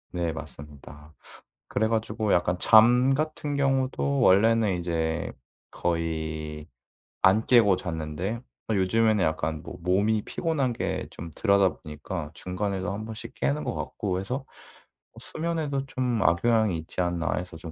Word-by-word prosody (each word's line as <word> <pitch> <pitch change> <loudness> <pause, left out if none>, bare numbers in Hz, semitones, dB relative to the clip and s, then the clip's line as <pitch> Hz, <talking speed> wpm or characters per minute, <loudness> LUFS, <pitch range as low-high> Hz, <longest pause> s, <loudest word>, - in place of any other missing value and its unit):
네. 85 -2 -1
맞습니다. 75 0 -11 0.5
그래가지고 110 -1 0
약간 90 0 +2
잠 120 +6 +6
같은 150 0 -2
경우도 135 0 +1
원래는 105 -1 +4
이제 85 -1 -2 0.4
거의 80 -2 -3 0.5
안 100 +4 +4
깨고 110 -7 +5
잤는데 85 +7 -4 0.3
요즘에는 110 +1 +2
약간 80 -1 -2
뭐 - - -8
몸이 100 +5 +1
피곤한 145 -7 -1
게 - - -3
좀 85 0 -8
들하다보니까 90 -5 0
중간에도 95 +1 -3
1 105 +2 -5
번씩 110 -1 -8
깨는 70 +3 -1
것 - - -2
같고 95 -3 -3
해서 125 +8 -4 0.7
'수면에도 155 -4 -3
좀 125 -3 -1
악영향이 105 +3 +3
있지 80 +3 -8
않나.' 85 -1 -1
해서 90 -1 -5
좀 80 0 -9
95 Hz, 270 characters per minute, -26 LUFS, 80-115 Hz, 0.7 s, 잠